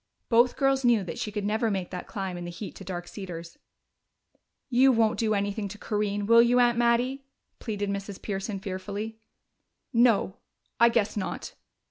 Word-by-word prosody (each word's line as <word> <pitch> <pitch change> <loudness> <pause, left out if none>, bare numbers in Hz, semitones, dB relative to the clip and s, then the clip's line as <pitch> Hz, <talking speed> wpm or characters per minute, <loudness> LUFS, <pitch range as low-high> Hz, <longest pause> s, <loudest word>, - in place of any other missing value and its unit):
Both 240 +1 +4
girls 270 -1 +2
knew 235 -4 +4
that 180 - -6
she 210 - -3
could 205 -1 -3
never 220 +2 +1
make 190 -3 -3
that 180 - -6
climb 190 -3 -4
in 175 - -6
the 175 - -5
heat 185 +4 -7
to - - -9
Dark 175 -1 -5
Cedars. 170 -4 -8 1.1
"You 260 +1 +5
won't 225 -2 +2
do 220 -2 +2
anything 200 +1 -1
to 205 +2 -9
Corinne, 205 -1 -1
will 230 +2 +7
you, 240 +1 +4
Aunt 240 -1 +4
Mattie?" 240 +3 +1 0.4
pleaded 205 -3 -3
Mrs. 200 0 -5
Pearson 195 0 -4
fearfully. 205 +3 -5 0.7
"No 230 -5 +3 0.4
I 235 - +7
guess 220 -3 +1
not. 205 - -4
210 Hz, 170 wpm, -27 LUFS, 195-235 Hz, 1.1 s, will